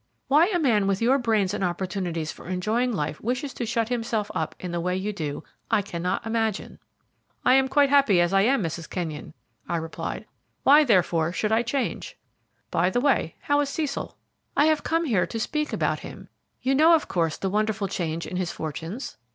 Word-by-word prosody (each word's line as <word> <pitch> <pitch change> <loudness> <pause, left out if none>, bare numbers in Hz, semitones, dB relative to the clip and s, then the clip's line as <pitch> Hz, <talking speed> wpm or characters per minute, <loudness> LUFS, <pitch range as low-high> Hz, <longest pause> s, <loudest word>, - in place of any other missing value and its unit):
"Why 305 +5 +5
a 385 -3 0
man 225 - +2
with 195 -1 +1
your 255 +4 +3
brains 215 -5 +1
and - - -2
opportunities 175 -2 -2
for - - -13
enjoying 215 +7 0
life 150 -7 -3
wishes 255 +4 -2
to 240 - -4
shut 230 0 0
himself 225 -3 -1
up 160 - -2
in 180 - -5
the 170 - -2
way 180 +1 -1
you 205 +3 -3
do, 155 -5 -4 0.3
I 205 - +2
cannot 180 +1 -3
imagine." 225 -2 -2 0.7
"I 255 - +6
am 265 0 +4
quite 280 +1 +3
happy 275 -10 +5
as 175 +2 +2
I 195 - +5
am, 245 +1 +2
Mrs. 165 0 -4
Kenyon," 160 -4 -5 0.3
I 170 - 0
replied; 165 0 -5 0.4
"why, 295 +3 +7
therefore, 175 - +2
should 215 +4 -1
I 220 +1 +4
change? 245 +3 -3 0.5
By 175 +2 +2
the 215 - 0
way, 245 - +1
how 290 0 +1
is 290 -1 0
Cecil?" 290 -1 -3 0.4
"I 290 - +5
have 310 -1 +3
come 330 +1 0
here 215 - +1
to 225 - -4
speak 300 +6 -2
about - - 0
him. - - -10 0.3
You 265 +2 +2
know, 320 +4 +6
of 315 - -1
course, 165 -3 0
the 190 - -2
wonderful 215 -1 0
change 170 -3 -3
in 180 - -5
his 180 -2 -1
fortunes?" 165 - -6
210 Hz, 200 wpm, -25 LUFS, 175-265 Hz, 0.7 s, why